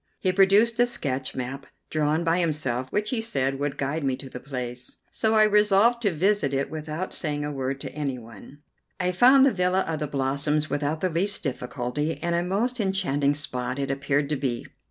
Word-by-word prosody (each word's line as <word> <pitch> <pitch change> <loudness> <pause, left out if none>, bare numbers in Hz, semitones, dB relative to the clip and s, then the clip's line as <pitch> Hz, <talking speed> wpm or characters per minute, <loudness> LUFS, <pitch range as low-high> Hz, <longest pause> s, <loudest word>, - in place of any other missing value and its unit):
He 185 - +1
produced 205 +5 +4
a 245 - +5
sketch 130 - -2
map, 135 +2 -5 0.2
drawn 155 +1 +1
by 165 +1 +2
himself, 135 -7 -1
which 210 +1 -1
he 240 -3 0
said 135 - -1
would 145 0 -2
guide 140 +3 -2
me 135 -2 +1
to 135 +1 -10
the 125 - -7
place, 125 -2 -6
so 220 0 +1
I 215 - +7
resolved 210 +3 +4
to 205 -4 +2
visit 170 -4 +1
it 135 0 -1
without 155 +3 -4
saying 145 -3 -3
a 150 - -3
word 135 -1 -3
to 135 - -6
anyone. 135 0 -7 0.4
I 180 0 +1
found 255 +8 +6
the 275 - +3
villa 180 0 +2
of 160 -4 -3
the 150 - -2
Blossoms 145 +2 0
without 145 +2 -1
the 185 - +1
least 185 +5 -1
difficulty, 135 +2 -3
and 170 0 0
a 170 - +2
most 215 +8 -1
enchanting 160 -9 +1
spot 125 -3 -3
it 140 0 -1
appeared 140 +1 0
to 150 - +1
be. 125 -3 -2
150 Hz, 195 wpm, -25 LUFS, 135-190 Hz, 0.4 s, I